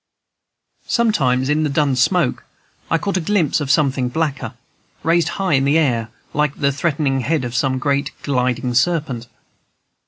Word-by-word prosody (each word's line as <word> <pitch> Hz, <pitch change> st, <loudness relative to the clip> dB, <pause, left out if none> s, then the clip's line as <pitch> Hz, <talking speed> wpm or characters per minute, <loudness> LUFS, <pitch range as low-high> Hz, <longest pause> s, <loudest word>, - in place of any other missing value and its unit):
Sometimes 135 Hz, -, +1 dB
in 150 Hz, +2 st, +1 dB
the 155 Hz, -, 0 dB
dun 140 Hz, -1 st, +1 dB
smoke 135 Hz, +2 st, +1 dB, 0.5 s
I 165 Hz, -, +3 dB
caught 195 Hz, +3 st, -2 dB
a -, -, -1 dB
glimpse 165 Hz, -4 st, +1 dB
of 140 Hz, -, -3 dB
something 135 Hz, -3 st, +2 dB
blacker, 135 Hz, -4 st, -2 dB, 0.5 s
raised 170 Hz, +1 st, +2 dB
high 190 Hz, -4 st, 0 dB
in 135 Hz, -1 st, +3 dB
the 140 Hz, +3 st, +3 dB
air 120 Hz, -8 st, +1 dB, 0.2 s
like 150 Hz, -1 st, 0 dB
the 140 Hz, -2 st, +1 dB
threatening 145 Hz, -2 st, 0 dB
head 145 Hz, +2 st, 0 dB
of 120 Hz, -, -5 dB
some 130 Hz, +1 st, +1 dB
great 140 Hz, +1 st, 0 dB
gliding 125 Hz, -2 st, 0 dB
serpent. 130 Hz, -4 st, 0 dB
140 Hz, 155 wpm, -19 LUFS, 130-160 Hz, 0.5 s, I